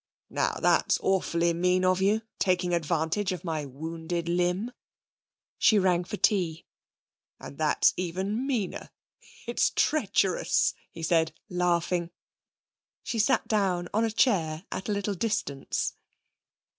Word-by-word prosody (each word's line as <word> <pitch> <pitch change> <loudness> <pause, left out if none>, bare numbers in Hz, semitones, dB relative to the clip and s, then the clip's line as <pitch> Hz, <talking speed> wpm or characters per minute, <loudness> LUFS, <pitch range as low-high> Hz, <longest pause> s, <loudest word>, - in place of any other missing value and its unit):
'Now - - 0
that's - - +3
awfully 170 -3 +1
mean 180 +2 +2
of 185 0 +2
you, 210 +3 +2 0.2
taking 180 -2 +1
advantage 170 +4 0
of 180 - -5
my 160 -4 -3
wounded 160 +4 -5
limb.' 180 +6 0 0.9
She 215 - +5
rang 180 -3 +2
for - - -5
tea. 180 -5 +1 0.7
'And 140 - -10
that's 155 -1 +3
even 190 +8 -2
meaner. 230 -9 -2 0.6
It's - - +2
treacherous,' 200 - +2 0.2
he 165 - -9
said, 160 -1 +2 0.2
laughing. 175 -1 0 0.9
She 230 - -3
sat 245 +2 +2
down 185 -5 0
on 220 +2 +2
a 225 - +1
chair 185 -8 +1
at 190 - -4
a - - +1
little 205 0 -1
distance. 190 -9 -2
180 Hz, 125 wpm, -27 LUFS, 170-200 Hz, 0.9 s, She